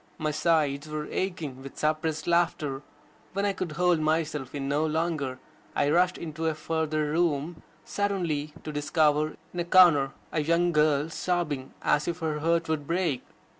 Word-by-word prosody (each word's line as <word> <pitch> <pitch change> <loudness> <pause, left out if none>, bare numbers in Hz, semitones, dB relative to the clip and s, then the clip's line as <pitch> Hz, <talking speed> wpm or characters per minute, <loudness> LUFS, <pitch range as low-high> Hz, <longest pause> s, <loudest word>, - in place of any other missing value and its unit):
My 155 -1 -1
sides 155 -2 +1
were 150 0 -3
aching 160 -9 -3
with 135 0 -10
suppressed 155 +1 -1
laughter. 165 -5 +1 0.5
When 200 +1 0
I 200 - +1
could 180 -4 -4
hold 175 0 +3
myself 155 -3 -1
in 135 -1 -3
no 145 +2 +1
longer, 155 -4 -1 0.4
I 145 - +2
rushed 180 +2 +3
into 160 0 -4
a 160 - 0
further 155 -1 -1
room, 160 0 0 0.2
suddenly 175 -7 -1
to 155 - -5
discover, 150 0 +1 0.2
in 175 - -4
a - - +1
corner, 170 -7 +6 0.2
a 155 - 0
young 170 +3 +2
girl 150 -1 +2
sobbing 155 -7 -2
as 150 - +2
if 170 -1 -1
her 155 -3 -2
heart 165 +2 +1
would 155 -3 -2
break. 170 -6 0
155 Hz, 165 wpm, -27 LUFS, 150-170 Hz, 0.5 s, corner